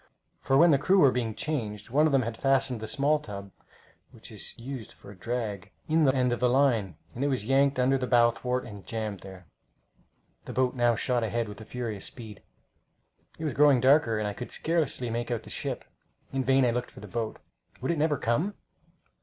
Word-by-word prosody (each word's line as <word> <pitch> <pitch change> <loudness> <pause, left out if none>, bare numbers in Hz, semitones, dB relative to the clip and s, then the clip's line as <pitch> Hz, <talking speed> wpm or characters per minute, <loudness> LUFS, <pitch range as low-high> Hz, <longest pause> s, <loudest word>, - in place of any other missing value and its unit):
for 135 0 +2
when 170 +3 +7
the 140 - +4
crew 190 +7 +3
were 140 -8 +6
being 115 -4 -2
changed 115 -10 -4
one 150 +4 +4
of - - 0
them 135 -2 +3
had 115 0 -4
fastened 135 -2 +1
the 110 - -6
small 150 +4 +1
tub, 100 -7 -8 0.6
which - - -12
is - - -9
used 125 -2 -7
for - - -14
a - - -12
drag, 105 -1 -4 0.2
in 160 0 +3
the 135 -1 +3
end 125 -1 +2
of 120 - -3
the 125 - +3
line, 120 - +2 0.2
and 125 - -3
it - - +2
was 130 -7 -1
yanked 135 +2 +3
under 130 +1 +2
the 125 - -2
bow 120 -1 +5
thwart 125 +2 -2
and 105 -4 -10
jammed 110 -3 -3
there. 95 -2 -12 1.0
The - - -7
boat 130 -1 +1
now 120 -2 +2
shot 120 +2 0
ahead 115 +1 -1
with 105 +1 -9
furious 115 -5 -4
speed. 110 -5 -10 1.0
It 160 - -7
was 150 -4 -1
growing 145 -1 +5
darker, 130 -3 +4
and 105 -1 -1
I 105 - -3
could 125 - -7
scarcely 155 -7 -1
make 120 +1 -3
out 120 -2 -2
the - - -11
ship. - - -4 0.5
In 135 -1 0
vain 135 0 +4
I 120 - +3
looked 125 +1 -2
for - - -13
the - - -10
boat. 115 -2 -3 0.4
Would 130 - -1
it 165 - -1
never 150 -1 +2
come! 155 - 0
125 Hz, 215 wpm, -28 LUFS, 110-135 Hz, 1.0 s, when